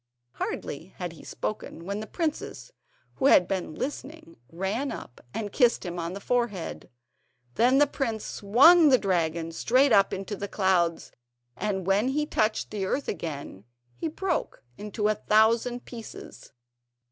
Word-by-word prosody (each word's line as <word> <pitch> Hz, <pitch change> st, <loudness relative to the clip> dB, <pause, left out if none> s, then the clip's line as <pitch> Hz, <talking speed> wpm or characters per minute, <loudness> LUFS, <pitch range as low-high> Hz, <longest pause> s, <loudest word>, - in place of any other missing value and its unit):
Hardly 160 Hz, +7 st, -5 dB
had 175 Hz, -2 st, -4 dB
he 165 Hz, -, -14 dB
spoken, 170 Hz, -5 st, -5 dB
when 200 Hz, +2 st, -3 dB
the 215 Hz, -, -6 dB
princess, 330 Hz, +8 st, -4 dB, 0.5 s
who 270 Hz, -, +3 dB
had 180 Hz, -9 st, +6 dB
been 185 Hz, -5 st, -3 dB
listening, 285 Hz, -, -6 dB, 0.2 s
ran 195 Hz, +11 st, -2 dB
up 120 Hz, -, -9 dB
and 205 Hz, -, -4 dB
kissed 240 Hz, -6 st, +3 dB
him 175 Hz, 0 st, -4 dB
on 170 Hz, +1 st, -3 dB
the 200 Hz, -, -6 dB
forehead. 235 Hz, -5 st, -2 dB, 0.6 s
Then 250 Hz, -, +4 dB
the 290 Hz, -, +6 dB
prince 230 Hz, -6 st, -3 dB
swung 290 Hz, -, +6 dB
the 260 Hz, -, +6 dB
dragon 170 Hz, -5 st, -1 dB
straight 255 Hz, +10 st, +3 dB
up 200 Hz, -2 st, +5 dB
into 195 Hz, +2 st, -4 dB
the 200 Hz, +1 st, -5 dB
clouds, 185 Hz, -5 st, +1 dB, 0.4 s
and 190 Hz, +4 st, -2 dB
when 195 Hz, +5 st, +2 dB
he 295 Hz, +3 st, 0 dB
touched 215 Hz, -6 st, 0 dB
the 205 Hz, -2 st, -3 dB
earth 265 Hz, +9 st, -1 dB
again, 145 Hz, -, -5 dB, 0.3 s
he -, -, -3 dB
broke 345 Hz, +2 st, -3 dB
into 210 Hz, -, -2 dB
a 215 Hz, -, +3 dB
thousand 230 Hz, +4 st, +2 dB
pieces. 230 Hz, -3 st, -10 dB
210 Hz, 150 wpm, -27 LUFS, 185-255 Hz, 0.6 s, had